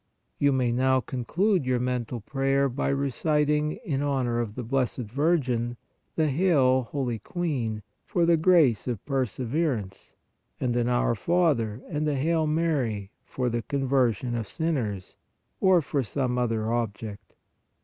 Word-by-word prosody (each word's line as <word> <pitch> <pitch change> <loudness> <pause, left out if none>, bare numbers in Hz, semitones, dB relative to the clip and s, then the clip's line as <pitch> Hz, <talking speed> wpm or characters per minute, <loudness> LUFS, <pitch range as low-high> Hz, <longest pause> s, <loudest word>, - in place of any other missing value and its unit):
You 145 0 +4
may 130 -3 +1
now 130 +2 +3
conclude 165 - 0
your 125 -1 +2
mental 125 -1 -2
prayer 135 +4 +1
by 130 +3 -2
reciting 150 +2 +1
in 140 -7 -1
honor 130 -5 0
of 110 -3 -3
the 125 - -4
Blessed 130 +1 0
Virgin 125 -2 0 0.4
the 160 -1 +2
Hail, 135 -5 +3
holy 125 -5 -2
Queen 125 - -3 0.2
for 175 -2 +1
the 170 0 +5
grace 160 - +4
of 120 -6 -3
per 135 -3 0
severance 120 - -3 0.4
and 125 -2 0
an 120 0 +1
Our 120 -1 +2
Father 130 - +1
and 155 -2 -2
a 145 - 0
Hail 160 +3 +1
Mary 140 -11 0
for 125 -1 -3
the 120 0 -1
conversion 130 -3 0
of 115 -3 -3
sinners, 120 - -3 0.4
or 185 -4 +4
for 140 0 -1
some 125 +1 -2
other 115 -2 0
object. 110 -3 -4
130 Hz, 145 wpm, -26 LUFS, 120-150 Hz, 0.4 s, the